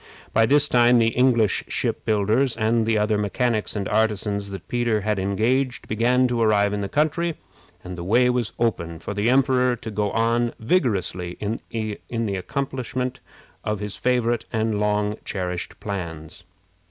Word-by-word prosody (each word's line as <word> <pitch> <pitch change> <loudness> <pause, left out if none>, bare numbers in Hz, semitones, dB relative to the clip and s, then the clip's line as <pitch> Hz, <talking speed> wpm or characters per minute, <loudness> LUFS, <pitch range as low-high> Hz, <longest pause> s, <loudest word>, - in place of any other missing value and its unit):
By 115 0 +4
this 145 +3 +4
time 120 -1 +5
the 115 -1 +4
English 120 -4 +2
ship - - -2
builders, 110 +5 +2
and 110 0 +1
the 110 -1 +2
other 105 0 +1
mechanics 110 +2 0
and 100 -2 -2
artisans 105 -2 0
that 95 -3 -8
Peter 120 -3 0
had 105 0 -1
engaged, 120 +7 0
began 125 +4 +2
to 120 -1 -1
arrive 105 -2 +3
in 105 - -2
the 100 - -3
country, 160 +3 0 0.5
and 90 0 -7
the 85 - -6
way 120 +7 +3
was 125 -3 0
open 85 -8 -1
for 85 - -6
the 105 +3 +1
emperor 125 -1 +3
to 110 -1 -8
go 105 0 -1
on 115 +2 +1
vigorously 100 - 0
in 105 +2 -2
the 110 -1 -3
accomplishment 130 +3 -3 0.4
of 105 -1 -2
his 105 -1 -3
favorite 120 -2 0
and 110 -2 0
long 105 0 0
cherished 90 -3 -4
plans. 85 -6 -6
110 Hz, 160 wpm, -23 LUFS, 100-125 Hz, 0.5 s, time